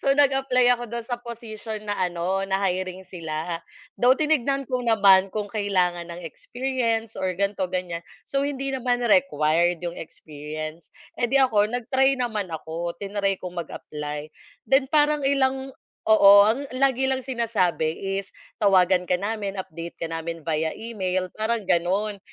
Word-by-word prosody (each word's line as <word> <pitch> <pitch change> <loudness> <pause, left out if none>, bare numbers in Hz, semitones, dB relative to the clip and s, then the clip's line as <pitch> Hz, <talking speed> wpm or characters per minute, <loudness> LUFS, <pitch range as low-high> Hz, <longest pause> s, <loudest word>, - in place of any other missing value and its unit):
so - - 0
nag-apply 270 -3 +3
ako 240 0 -1
dun 235 +1 -3
sa 240 +1 -4
position 220 -2 -7
na 205 - -2
ano, 180 +1 -1
na 195 +1 0
hiring 185 0 -2
sila. 165 -1 -4 0.4
Though, 250 +1 +6
tinignan 275 -3 +1
ko 255 - +1
naman 200 -5 +5
kung 210 -1 -3
kailangan 180 -5 0
ng 170 +1 -8
experience 230 - -2
or 185 -1 -1
ganito, 200 -1 0
ganyan. 175 -2 -3 0.2
So, 275 -1 -1
hindi 275 -1 -3
naman 245 -2 0
required 175 - +2
yung 175 0 -4
experience. 155 +1 -8 0.3
Eh, 240 - +3
di 270 - +2
ako 210 -5 +3
nag-try 260 +3 +2
naman 220 -6 -2
ako, 165 +2 -5
tinry 200 0 0
kong 180 -1 -7
mag-apply. 150 0 -6 0.3
Then 270 0 +3
parang 295 -1 +2
ilang 265 -1 0 0.3
oo, 215 -2 +7 0.2
ang 265 +6 0
lagi 265 0 +2
lang 265 0 +1
sinasabi 195 -7 -1
is, 195 - -5 0.3
"Tawagan 185 -2 +4
ka 180 - +1
namin. 205 -1 -3
Update 170 -1 -8
ka 165 - -2
namin 165 0 -4
via 160 0 -1
email." 185 -5 -3
Parang 220 +1 0
gano'n. 195 +4 0
205 Hz, 150 wpm, -24 LUFS, 175-245 Hz, 0.4 s, oo